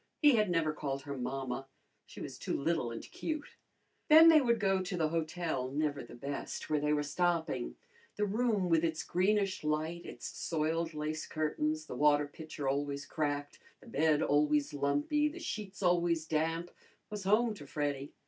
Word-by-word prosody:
He 295 Hz, -2 st, +7 dB
had 210 Hz, -3 st, +2 dB
never 165 Hz, -3 st, +1 dB
called 140 Hz, -2 st, -3 dB
her 140 Hz, 0 st, -5 dB
mamma. 135 Hz, +1 st, -3 dB, 0.4 s
She -, -, -10 dB
was -, -, -7 dB
too -, -, -2 dB
little 140 Hz, -4 st, 0 dB
and 115 Hz, -1 st, -6 dB
cute. 310 Hz, -2 st, -5 dB, 0.6 s
Then 320 Hz, +2 st, +10 dB
they 315 Hz, -2 st, +7 dB
would 235 Hz, -3 st, +2 dB
go 195 Hz, -2 st, +2 dB
to 180 Hz, 0 st, -3 dB
the 160 Hz, -2 st, +1 dB
hotel, 160 Hz, -4 st, -2 dB
never 145 Hz, +1 st, -1 dB
the -, -, -11 dB
best, 140 Hz, +5 st, -5 dB
where 150 Hz, -, +3 dB
they 150 Hz, +1 st, 0 dB
were 150 Hz, -1 st, +2 dB
stopping. 160 Hz, -, -1 dB, 0.4 s
The 210 Hz, -, +1 dB
room 210 Hz, -2 st, +1 dB
with 165 Hz, -1 st, +3 dB
its 160 Hz, -1 st, 0 dB
greenish 195 Hz, +1 st, +1 dB
light, 155 Hz, +3 st, -1 dB
its -, -, -9 dB
soiled 160 Hz, 0 st, -1 dB
lace 155 Hz, +1 st, -3 dB
curtains, 155 Hz, 0 st, -1 dB
the -, -, -7 dB
water 145 Hz, +2 st, +4 dB
pitcher 145 Hz, -1 st, -6 dB
always 140 Hz, +1 st, -1 dB
cracked, 145 Hz, -2 st, -2 dB, 0.2 s
the -, -, -18 dB
bed 155 Hz, +1 st, +2 dB
always 150 Hz, 0 st, +2 dB
lumpy, 145 Hz, -, +1 dB
the 305 Hz, +3 st, -6 dB
sheets 210 Hz, -, -5 dB
always 170 Hz, -2 st, +2 dB
damp, 165 Hz, +2 st, -1 dB, 0.4 s
was 210 Hz, -2 st, -4 dB
home 220 Hz, +3 st, +3 dB
to 145 Hz, -9 st, -11 dB
Freddy. 145 Hz, -1 st, -2 dB
155 Hz, 175 wpm, -33 LUFS, 145-185 Hz, 0.6 s, Then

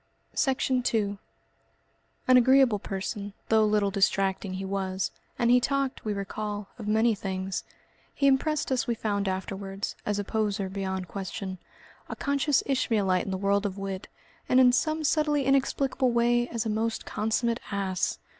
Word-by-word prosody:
Section 260 Hz, -2 st, +1 dB
2 210 Hz, -5 st, 0 dB, 1.1 s
An 255 Hz, -, +7 dB
agreeable 255 Hz, -3 st, +5 dB
person, 200 Hz, +1 st, -4 dB, 0.2 s
though 220 Hz, -1 st, +5 dB
a 215 Hz, -, +3 dB
little 205 Hz, -1 st, +2 dB
distracting, 195 Hz, -1 st, +1 dB
he 190 Hz, +1 st, -4 dB
was, 190 Hz, -1 st, -2 dB, 0.3 s
and 235 Hz, 0 st, +3 dB
he 250 Hz, -, +7 dB
talked, 275 Hz, +1 st, -1 dB
we 215 Hz, -, -2 dB
recall, 205 Hz, +1 st, -4 dB
of 215 Hz, -, -6 dB
many 220 Hz, +2 st, +3 dB
things. 190 Hz, -1 st, -3 dB, 0.5 s
He 280 Hz, -, +1 dB
impressed 275 Hz, +2 st, +2 dB
us, 255 Hz, -2 st, +1 dB
we 235 Hz, -, 0 dB
found 205 Hz, -2 st, -1 dB
afterwards, 195 Hz, +1 st, -4 dB
as 205 Hz, -1 st, -1 dB
a 205 Hz, -, -1 dB
poseur 205 Hz, -2 st, -1 dB
beyond 190 Hz, -1 st, -3 dB
question, 190 Hz, 0 st, -5 dB, 0.5 s
a -, -, -4 dB
conscious 280 Hz, 0 st, +1 dB
Ishmaelite 210 Hz, -9 st, +1 dB
in -, -, -5 dB
the 190 Hz, -, -1 dB
world 200 Hz, +1 st, +1 dB
of 200 Hz, -2 st, -3 dB
wit, 195 Hz, -1 st, -5 dB, 0.4 s
and 255 Hz, -, +5 dB
in 250 Hz, -1 st, +7 dB
some 310 Hz, +5 st, +1 dB
subtly 295 Hz, -2 st, +2 dB
inexplicable 270 Hz, -1 st, +2 dB
way 240 Hz, 0 st, +2 dB
as 230 Hz, -2 st, -3 dB
a -, -, -1 dB
most 220 Hz, +1 st, -1 dB
consummate 230 Hz, +2 st, 0 dB
ass. 190 Hz, -2 st, -1 dB
210 Hz, 160 wpm, -27 LUFS, 195-250 Hz, 1.1 s, An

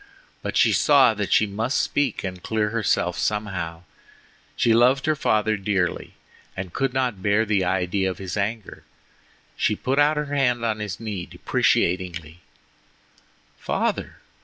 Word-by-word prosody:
But -, -, -3 dB
she -, -, +4 dB
saw 140 Hz, -5 st, +5 dB
that 105 Hz, -2 st, -4 dB
she 110 Hz, -, +4 dB
must 110 Hz, +6 st, -2 dB
speak 140 Hz, -6 st, -1 dB
and 90 Hz, -2 st, -5 dB
clear 105 Hz, +1 st, -1 dB
herself 105 Hz, -5 st, 0 dB
somehow. 90 Hz, -6 st, -3 dB, 0.7 s
She 115 Hz, -, +3 dB
loved 125 Hz, +4 st, +4 dB
her 155 Hz, -, +2 dB
father 110 Hz, -5 st, +1 dB
dearly, 95 Hz, -3 st, -2 dB, 0.4 s
and 95 Hz, -2 st, -6 dB
could 135 Hz, -2 st, 0 dB
not 125 Hz, -6 st, -1 dB
bear 100 Hz, +3 st, +2 dB
the 100 Hz, -3 st, +1 dB
idea 95 Hz, +1 st, 0 dB
of 90 Hz, -, -5 dB
his 95 Hz, -2 st, -5 dB
anger. 105 Hz, +1 st, -4 dB, 0.7 s
She 105 Hz, -, +1 dB
put 135 Hz, +6 st, -1 dB
out 150 Hz, +1 st, +4 dB
her 150 Hz, -1 st, -3 dB
hand 125 Hz, -4 st, +1 dB
on 110 Hz, -1 st, -1 dB
his 105 Hz, -2 st, -5 dB
knee 105 Hz, -6 st, -5 dB
deprecatingly: 85 Hz, -2 st, -1 dB, 1.2 s
"Father! -, -, -2 dB
105 Hz, 145 wpm, -23 LUFS, 95-120 Hz, 1.2 s, saw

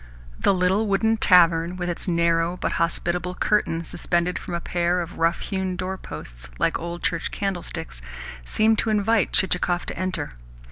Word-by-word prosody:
The -, -, +3 dB
little 190 Hz, +3 st, +2 dB
wooden 220 Hz, +3 st, +2 dB
tavern, 170 Hz, -3 st, +5 dB
with 175 Hz, -1 st, -3 dB
its 175 Hz, +3 st, -4 dB
narrow, 170 Hz, 0 st, +1 dB
but -, -, -2 dB
hospitable, 175 Hz, +1 st, -1 dB
curtain 170 Hz, -6 st, +1 dB
suspended 175 Hz, +1 st, -1 dB
from 175 Hz, -, -5 dB
a -, -, -1 dB
pair 175 Hz, +1 st, 0 dB
of 175 Hz, 0 st, -6 dB
rough 165 Hz, +1 st, +1 dB
hewn 190 Hz, -1 st, -2 dB
doorposts 180 Hz, -, -7 dB
like -, -, +1 dB
old 170 Hz, +1 st, -6 dB
church 165 Hz, -1 st, -1 dB
candlesticks, 175 Hz, -, -4 dB, 0.4 s
seemed 220 Hz, -, +2 dB
to 225 Hz, -, +1 dB
invite 215 Hz, 0 st, +2 dB
Chichikov 180 Hz, -1 st, +2 dB
to -, -, -5 dB
enter. 185 Hz, -, -3 dB
180 Hz, 155 wpm, -24 LUFS, 170-190 Hz, 0.4 s, tavern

